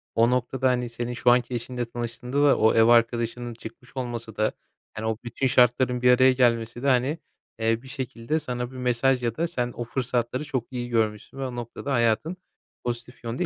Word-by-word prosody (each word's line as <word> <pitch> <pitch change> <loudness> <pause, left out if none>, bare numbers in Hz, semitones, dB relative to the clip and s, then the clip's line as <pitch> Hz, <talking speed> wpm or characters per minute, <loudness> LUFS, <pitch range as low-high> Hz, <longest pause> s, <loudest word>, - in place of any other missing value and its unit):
o 115 +1 +4
noktada, 125 +1 +1
hani, 125 -1 0
senin 120 +1 -4
şu 120 0 +3
anki 125 0 +2
eşinle 120 +1 -3
tanıştığında 120 +4 -3
da 145 -2 +5
o 110 - +4
ev 115 - +5
arkadaşının 120 0 +2
çıkmış 115 +4 -12
olması 115 -3 -4
da, 110 - +1 0.4
hani, 110 - -5
o 110 -1 -1
bütün 130 +3 -1
şartların 125 0 +3
bir 125 0 +6
araya 130 +1 +6
gelmesi 120 -1 +1
de, 140 - +1
hani, 130 +4 +2 0.4
eee, 115 0 +1
bir 130 - -14
şekilde 130 +1 -3
sana 125 -3 -4
bir 130 - -10
mesaj 125 +1 +1
ya 115 -1 -1
da 170 +1 +1
sen 125 -7 -2
o 120 - -3
fırsatları 125 +1 -2
çok 130 -5 -3
iyi 120 -1 -4
görmüşsün 110 +1 -1
ve 135 - -2
o 125 - -7
noktada 120 +4 -5
hayatın 120 +9 +1 0.5
pozitif 120 +1 -5
yönde 115 +2 -2
120 Hz, 195 wpm, -25 LUFS, 115-130 Hz, 0.5 s, bir